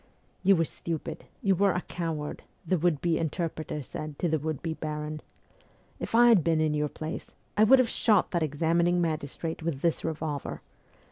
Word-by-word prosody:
' - - -38
You 195 +1 +6
were 165 -1 +2
stupid, 165 0 -4 0.2
you 195 - +4
were 195 +1 +3
a 180 - -1
coward,' 160 -5 -4 0.2
the 180 +1 +1
would 160 -3 +1
be 170 -2 +1
inter 165 +1 -1
preter 155 -2 -5
said 150 +2 -7
to 175 - 0
the 160 -1 +1
would 155 0 -3
be 165 -2 -1
baron. 155 -1 -4 0.4
' - - -32 0.3
If - - -3
I 240 +1 +7
had 210 -8 +6
been 165 0 +2
in 155 -1 +2
your 150 0 0
place, 155 +3 -6 0.2
I 215 - +6
would 265 +5 +8
have 255 -2 +4
shot 215 -3 +2
that 170 - 0
examining 170 +4 +2
magis 155 -5 -2
trate 165 -1 -4
with 160 -4 -2
this 170 -2 +1
revolver. 155 -3 -3
160 Hz, 205 wpm, -28 LUFS, 155-175 Hz, 0.4 s, would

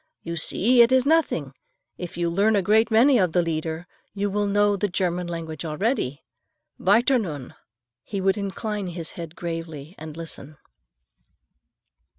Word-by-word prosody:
"You 170 0 -4
see 235 +9 +3
it 235 +1 +6
is 260 0 +4
nothing. 280 - +1 0.4
If 175 -2 -7
you 170 0 0
learn 200 +6 +2
a 200 - +2
great 220 +3 +4
many 240 +3 +5
of 180 -4 +1
the 180 - +4
Lieder, 160 0 -3 0.3
you 200 0 -1
will 205 +1 0
know 205 0 +3
the 205 +1 0
German 180 -1 -1
language 165 -3 -5
already. 155 - -1 0.6
Weiter, 235 +7 +4
nun." 150 - -5 0.5
He 200 - -5
would 190 0 +2
incline 205 0 -3
his 170 -2 -5
head 170 -1 -8
gravely 165 -2 -6
and 155 0 -8
listen. 155 -3 -7
180 Hz, 155 wpm, -24 LUFS, 165-210 Hz, 0.6 s, it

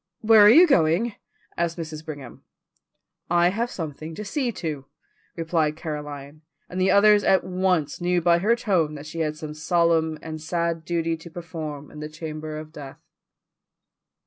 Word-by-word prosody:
"Where 220 0 +6
are 205 - +9
you 325 +11 +8
going?" 195 - +2 0.4
asked 170 0 -1
Mrs. 155 -2 -6
Brigham. 145 -6 -9 0.9
"I 175 +1 +4
have 230 +6 -2
something 160 - -6
to 210 - -6
see 255 +3 -1
to," 150 -8 -5 0.5
replied 160 -2 0
Caroline, 150 -2 -7 0.3
and 185 +1 -4
the 190 - +3
others 210 0 +5
at 190 - +3
once 180 -5 0
knew 175 0 +2
by 170 0 +3
her 215 +6 +3
tone 175 -10 0
that 145 0 -9
she 160 +2 -7
had 155 -1 -1
some 155 -1 -7
solemn 160 0 +1
and 155 -1 -6
sad 165 0 -2
duty 165 -1 -1
to 165 +2 -12
perform 160 -4 -7
in 150 - -10
the 150 0 -6
chamber 155 0 -6
of 155 0 -9
death. 140 -4 -9
165 Hz, 165 wpm, -24 LUFS, 155-180 Hz, 0.9 s, are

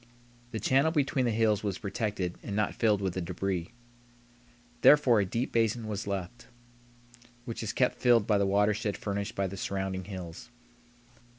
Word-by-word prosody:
The 110 - -4
channel 135 +8 +3
between 140 -4 +1
the - - +2
hills 110 -2 +2
was 100 -3 -2
protected 100 -3 -3
and 100 - -5
not 105 0 0
filled 105 -3 +1
with 95 -2 -1
the 95 - -3
débris. 90 0 -3 1.1
Therefore 135 -7 +6
a 100 - +2
deep 115 +7 -2
basin 115 0 +1
was 105 -1 -4
left, 100 +4 -5 1.0
which 115 -2 -5
is 110 - -2
kept 125 - +1
filled 120 -4 +5
by 105 -2 +2
the 100 - +2
watershed 105 +1 +1
furnished 100 +1 -4
by 100 - 0
the 95 +1 -5
surrounding 95 -1 -3
hills. 90 0 -8
105 Hz, 165 wpm, -29 LUFS, 95-115 Hz, 1.1 s, Therefore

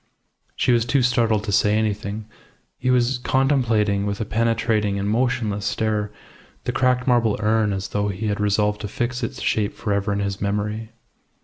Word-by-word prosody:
She - - +2
was 120 -1 +3
too 130 +2 +1
startled 115 -3 +2
to 105 - -3
say 105 +1 +3
anything; 105 0 -2 0.5
he 130 - -1
was 125 0 +2
contemplating 115 -7 +1
with 100 0 -3
a 110 - -2
penetrating 110 -2 +1
and 100 0 -2
motionless 115 -3 0
stare 105 -1 -1 0.5
the - - -1
cracked 125 -1 +1
marble 120 -4 +2
urn 110 -1 +2
as 95 -1 -3
though 105 0 -1
he 100 +2 -4
had 105 -1 -1
resolved 105 0 +1
to 105 - -3
fix 120 +4 -3
its 130 +2 -4
shape 105 -1 0
for 105 - -2
ever 100 +1 0
in 100 - 0
his 100 -1 -3
memory. 105 +2 -2
110 Hz, 180 wpm, -22 LUFS, 105-120 Hz, 0.5 s, was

